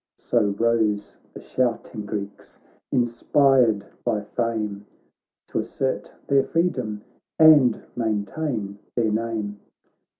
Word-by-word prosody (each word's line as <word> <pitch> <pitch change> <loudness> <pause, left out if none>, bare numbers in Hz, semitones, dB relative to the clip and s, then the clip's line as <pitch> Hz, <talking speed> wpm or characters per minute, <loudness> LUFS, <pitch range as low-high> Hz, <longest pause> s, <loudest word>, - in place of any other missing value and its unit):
So 120 - +1 0.2
rose 110 -3 +1 0.2
the - - -7
shouting 115 -4 -2
Greeks, 100 -1 -6 0.3
inspired 120 -2 +3 0.2
by 105 -1 0
fame 105 -3 -3 0.6
T' - - -2
assert 135 -1 -3
their 140 -1 +3
freedom 110 -11 -1 0.3
and 150 -7 +6
maintain 110 -1 -2 0.2
their 115 -3 +1
name. 110 -2 -2
115 Hz, 95 wpm, -24 LUFS, 105-125 Hz, 0.6 s, and